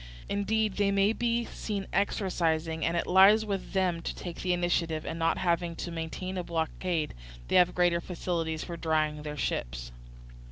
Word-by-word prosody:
Indeed, 210 Hz, +1 st, 0 dB
they 205 Hz, -1 st, +3 dB
may 200 Hz, +2 st, +3 dB
be 235 Hz, 0 st, 0 dB
seen 200 Hz, -4 st, -4 dB
exercising, 165 Hz, -5 st, 0 dB
and 170 Hz, +1 st, +1 dB
it -, -, 0 dB
lies 195 Hz, +4 st, +6 dB
with 200 Hz, -3 st, -4 dB
them 180 Hz, -3 st, +1 dB
to -, -, -4 dB
take 175 Hz, -2 st, -7 dB
the 185 Hz, -, 0 dB
initiative; 175 Hz, -3 st, 0 dB
and 165 Hz, -, -4 dB
not 165 Hz, 0 st, +2 dB
having 170 Hz, -1 st, 0 dB
to 170 Hz, -, -5 dB
maintain 170 Hz, +3 st, -4 dB
a -, -, -2 dB
blockade, 165 Hz, 0 st, -2 dB, 0.4 s
they -, -, +1 dB
have 180 Hz, 0 st, +4 dB
greater 175 Hz, -1 st, +3 dB
facilities 165 Hz, -3 st, -2 dB
for 170 Hz, -, -6 dB
drying 155 Hz, -2 st, 0 dB
their 150 Hz, 0 st, -6 dB
ships. -, -, -3 dB
175 Hz, 170 wpm, -29 LUFS, 160-195 Hz, 0.4 s, lies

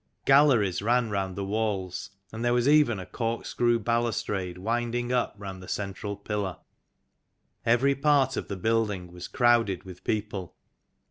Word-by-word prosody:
Galleries 135 Hz, -10 st, +4 dB
ran 115 Hz, +1 st, +1 dB
round 95 Hz, -2 st, -2 dB
the 100 Hz, -, -3 dB
walls, 100 Hz, -4 st, -2 dB, 0.2 s
and 110 Hz, +1 st, -4 dB
there 120 Hz, 0 st, +2 dB
was 120 Hz, +1 st, +2 dB
even 145 Hz, -7 st, +5 dB
a 95 Hz, -, -6 dB
corkscrew 115 Hz, +3 st, 0 dB
balustrade 110 Hz, -5 st, -1 dB
winding 120 Hz, +4 st, -1 dB
up 125 Hz, -3 st, 0 dB
round 95 Hz, -2 st, -7 dB
the 95 Hz, -, -11 dB
central 100 Hz, 0 st, -4 dB
pillar. 100 Hz, -2 st, -3 dB, 1.1 s
Every 125 Hz, +4 st, +4 dB
part 140 Hz, -2 st, +2 dB
of -, -, -4 dB
the 100 Hz, -, -4 dB
building 105 Hz, -4 st, 0 dB
was 90 Hz, 0 st, -8 dB
crowded 120 Hz, -6 st, +2 dB
with 90 Hz, -2 st, -11 dB
people. 105 Hz, -4 st, -3 dB
110 Hz, 145 wpm, -27 LUFS, 95-120 Hz, 1.1 s, even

